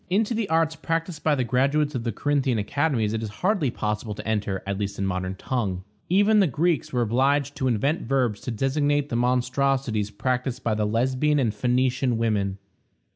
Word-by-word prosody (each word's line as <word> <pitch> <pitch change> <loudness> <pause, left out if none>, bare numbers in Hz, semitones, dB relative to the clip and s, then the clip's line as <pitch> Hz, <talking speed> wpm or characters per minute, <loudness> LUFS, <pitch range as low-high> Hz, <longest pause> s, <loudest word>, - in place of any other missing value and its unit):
Into 210 +5 +1
the 220 -3 -2
arts 160 -1 +2
practiced 165 -1 -3
by 155 -2 +3
the 130 - 0
graduates 140 +4 +1
of 125 -3 -3
the 115 - -1
Corinthian 135 +1 0
academies 115 0 0
it 115 - -2
is 110 - -4 0.2
hardly 190 -9 +2
possible 105 -1 -3
to - - -8
enter, 105 -3 -1
at 100 0 -3
least 100 -1 -3
in 100 - -1
a - - 0
modern 95 0 -2
tongue. 95 -4 -2 0.3
Even 205 +4 +4
the 195 - +4
Greeks 160 +3 0
were 125 -2 +1
obliged 135 +5 +1
to 130 - 0
invent 135 +7 +1
verbs 125 -6 0
to - - -5
designate 145 +4 0
the 115 - -2
monstrosities 125 -2 +1
practiced 125 +4 -2
by 115 - +1
the 105 0 0
Lesbian 130 +7 +1
and 120 -7 +1
Phoenician 125 +2 +1
women. 105 -4 0
125 Hz, 190 wpm, -25 LUFS, 110-145 Hz, 0.3 s, Even